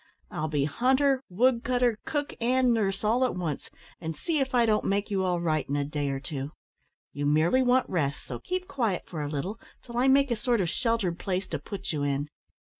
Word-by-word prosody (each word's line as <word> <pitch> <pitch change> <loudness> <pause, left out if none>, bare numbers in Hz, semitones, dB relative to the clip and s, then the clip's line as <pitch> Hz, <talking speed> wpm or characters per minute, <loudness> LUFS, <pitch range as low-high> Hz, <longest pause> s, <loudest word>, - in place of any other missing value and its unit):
I'll 155 - -2
be 145 -2 +1
hunter, 260 - +2
woodcutter, 245 +2 +2
cook, 290 -1 -2
and 250 +1 +3
nurse 200 -3 0
all 230 +4 +3
at 255 - +1
once, 165 -6 -3 0.3
and 160 -1 -4
see 330 -3 0
if 265 -1 0
I 240 -1 +5
don't 215 -1 +2
make 200 +2 0
you 190 -1 +1
all 180 -2 +1
right 155 -5 0
in 140 - 0
a 145 -1 0
day 145 -1 -2
or 135 0 -2
two. 140 +1 -5 0.6
You 145 0 -1
merely 160 - +4
want 255 0 +3
rest, 150 -6 -1
so - - -6
keep 370 0 -3
quiet 230 -10 -1
for 160 -4 -5
a 145 - -3
little 180 +10 -3 0.2
till 235 -1 -7
I 260 - +3
make 275 0 +4
a - - +3
sort 240 +1 +1
of 180 -4 +1
sheltered 225 -6 0
place 190 0 -1
to 155 - -2
put 195 +6 -5
you 150 -3 -2
in." 145 +1 -1
200 Hz, 215 wpm, -28 LUFS, 155-250 Hz, 0.6 s, I